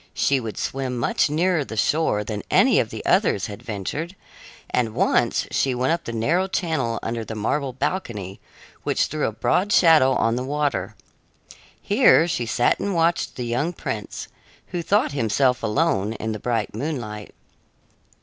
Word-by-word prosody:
She 140 -1 +2
would 115 -4 -6
swim 130 -2 -3
much 120 - +1
nearer 165 +1 +1
the 110 - -8
shore 125 -5 +1
than 105 -1 -4
any - - +4
of - - 0
the - - -7
others 100 - +2
had 105 +1 -8
ventured, 125 - -5 0.6
and 115 -3 0
once - - +2
she 130 -2 +1
went 130 +5 +1
up 170 0 -3
the - - -4
narrow 160 +12 +1
channel 155 -11 -1
under 115 0 -3
the 110 +1 -7
marble 135 +6 -1
balcony, 110 - -4 0.4
which - - +1
threw 155 0 -2
a - - -2
broad 180 - 0
shadow 160 -9 +6
on 115 +1 +1
the 125 - -2
water. 135 -8 -2 0.8
Here 205 -6 +4
she 120 -8 -2
sat 120 +2 +2
and 200 -2 -2
watched 165 +1 +1
the 125 - -4
young 125 +9 -1
prince, 110 -9 -5 0.4
who 175 -1 -3
thought 205 +5 +2
himself 125 0 +1
alone 110 -3 +1
in 110 0 -4
the 110 - -4
bright 115 -1 -2
moonlight. 110 -5 -5
125 Hz, 165 wpm, -23 LUFS, 110-160 Hz, 0.8 s, shadow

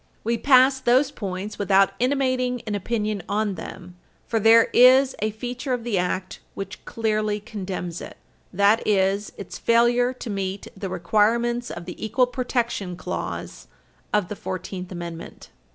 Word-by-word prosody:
We 230 +2 +1
pass 260 +2 +5
those 260 +3 +3
points 200 -3 -5
without 195 -1 +4
intimating 255 -1 0
an 215 - -3
opinion 210 0 -2
on 205 0 0
them, 180 -1 -9 0.3
for 225 - 0
there 225 +2 +7
is 260 +2 +6
a 215 - 0
feature 245 +5 -4
of 245 -2 -2
the 225 -5 0
Act 185 +1 -2 0.2
which 195 +1 -7
clearly 215 -2 -1
condemns 185 -4 -5
it. - - -9 0.3
That 200 +4 +3
is 200 0 +1
its 200 - -8
failure 240 +1 +3
to 250 -2 -8
meet 195 0 -3
the 195 0 -5
requirements 230 +7 +1
of 175 - -7
the 180 - -8
equal 230 +4 +2
protection 240 -7 -2
clause - - -5 0.4
of 210 -4 +1
the 210 - -5
Fourteenth 185 -1 -6
Amendment. 170 -2 -8
215 Hz, 150 wpm, -24 LUFS, 195-240 Hz, 0.4 s, there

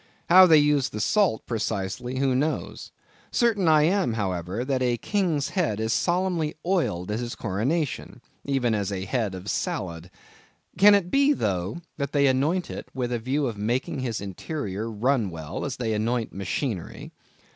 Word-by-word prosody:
How 185 +1 +9
they 160 -2 +7
use 145 -3 +3
the 105 - -6
salt, 185 - +2
precisely—who 115 +4 -2
knows? 145 +5 -2 0.4
Certain 220 -7 +2
I 155 -1 +5
am, 180 - +2
however, 95 +1 -2
that 130 -1 0
a 120 -1 +1
king's 170 - 0
head 160 - -1
is 110 +1 0
solemnly 175 0 0
oiled 130 - 0
at 105 - -1
his 120 -1 -4
coronation, 125 - -2 0.2
even 135 -4 0
as 100 -2 -1
a 95 -1 -3
head 105 -2 -1
of 95 +2 -9
salad. 85 -3 -3 0.7
Can 205 +3 +7
it 180 -3 0
be, 280 +1 +4
though, 100 - -2 0.2
that 140 -1 -3
they 140 -1 +3
anoint 145 +7 +1
it - - -7
with 125 -2 -2
a 120 - -1
view 135 +5 -1
of 115 -5 -4
making 125 +4 -1
its 120 -4 -2
interior 105 - -4
run 115 0 +1
well, 80 -3 -6
as 135 -3 -4
they 115 -3 -1
anoint 115 +2 -1
machinery? 100 - -4
125 Hz, 165 wpm, -25 LUFS, 105-155 Hz, 0.7 s, How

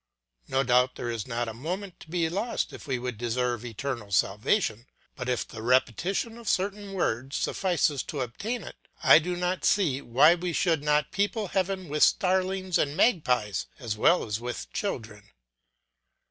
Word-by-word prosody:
No 135 +1 +1
doubt 125 0 +3
there 120 - -3
is 115 -3 -4
not 120 -1 -2
a 115 - -4
moment 180 - -5
to - - -14
be 170 -1 +1
lost 200 +8 -2
if - - -10
we 130 -2 0
would 120 -3 -5
deserve 120 0 -1
eternal 120 -2 -5
salvation; 110 - +1 0.3
but 125 0 -4
if 125 - -1
the 110 - -9
repetition 170 - +1
of 230 - -4
certain 200 +1 -1
words 135 -7 -1
suffices 170 -7 +1
to 145 - -4
obtain 205 - -4
it, - - -12 0.2
I - - +8
do 175 +2 -3
not 180 +1 -2
see 155 -10 +2
why 140 +8 +5
we 175 0 -3
should 165 -2 +2
not 150 0 +2
people 200 +2 -1
heaven 190 -1 -1
with 150 +1 -2
starlings 185 -1 +2
and 145 0 0
magpies 125 - +2
as 115 -6 -4
well 170 +11 +3
as 105 0 -3
with 120 +1 -6
children. 110 - -4
145 Hz, 170 wpm, -27 LUFS, 120-185 Hz, 0.3 s, I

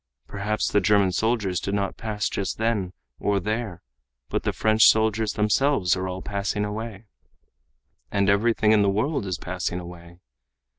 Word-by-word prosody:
Perhaps 105 +2 -2
the 105 - +2
German 100 0 +3
soldiers 105 -2 0
did 100 +3 -2
not 100 -1 -1
pass 105 -2 -3
just 100 - -3
then 110 -5 0 0.3
or 100 -1 +1
there. 105 -3 -3 0.5
But - - -1
the - - -1
French 110 0 +4
soldiers 110 -1 +2
themselves 105 - +2
are 95 0 -3
all 95 0 -5
passing 105 0 -2
away. 110 0 -6 1.1
And 100 -1 +1
everything 105 +2 +3
in 110 -1 +5
the 100 - +3
world 110 +3 -1
is 90 -2 -2
passing 90 0 -3
away. 85 -1 -11
105 Hz, 155 wpm, -24 LUFS, 95-110 Hz, 1.1 s, in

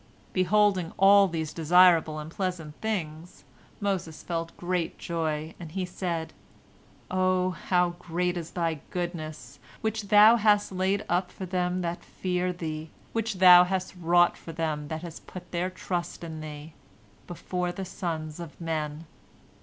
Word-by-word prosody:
Beholding 185 -2 +2
all 200 +1 +7
these 160 -3 -3
desirable 165 -1 +5
and 155 +1 -7
pleasant 180 -5 -3
things, 175 -6 -4 0.4
Moses 190 -6 -2
felt 165 -1 -4
great 175 -1 -2
joy, 160 -2 -3
and 165 -3 -9
he 190 -1 -1
said, 175 -2 -4 0.8
"Oh, 185 0 +2
how 180 -1 +1
great 180 +1 -1
is 170 -2 -5
Thy 165 -3 -2
goodness, 155 -7 -5 0.2
which 220 -1 -2
Thou 215 +3 +8
hast 210 -2 +3
laid 190 +2 0
up 180 +1 0
for 190 - -7
them 180 0 -1
that 170 0 -3
fear 180 0 -2
Thee, 160 -3 -5 0.2
which 225 -2 -1
Thou 180 -1 +9
hast 185 0 -2
wrought 175 0 +3
for 165 - -9
them 155 -2 -2
that 160 +2 -6
put 180 -1 -10
their 175 +1 -1
trust 180 -2 -4
in 160 -2 -6
Thee, 155 0 -8 0.5
before 180 +1 -3
the 190 +1 -5
sons 160 -4 -4
of 170 -3 -9
men!" 155 -1 -3
175 Hz, 145 wpm, -27 LUFS, 160-185 Hz, 0.8 s, Thou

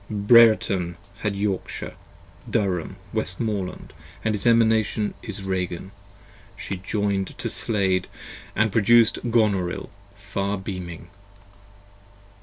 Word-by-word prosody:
Brertun 105 -4 +4 0.3
had 105 -2 -1
Yorkshire, 100 -1 -3 0.6
Durham, 95 -7 -1 0.2
Westmoreland, 95 -1 -3 0.2
& - - -21
his 110 +1 0
Emanation 110 -2 +3
Is 105 -4 -7
Ragan: 95 -1 -3 0.7
she - - -5
adjoin'd 100 0 -2
to - - -2
Slade, 95 -4 0 0.3
& - - -21 0.2
produced 115 +2 +5
Gonorill 100 -6 +1 0.3
far 100 0 -3
beaming. 90 -3 -7
100 Hz, 90 wpm, -24 LUFS, 95-110 Hz, 0.7 s, produced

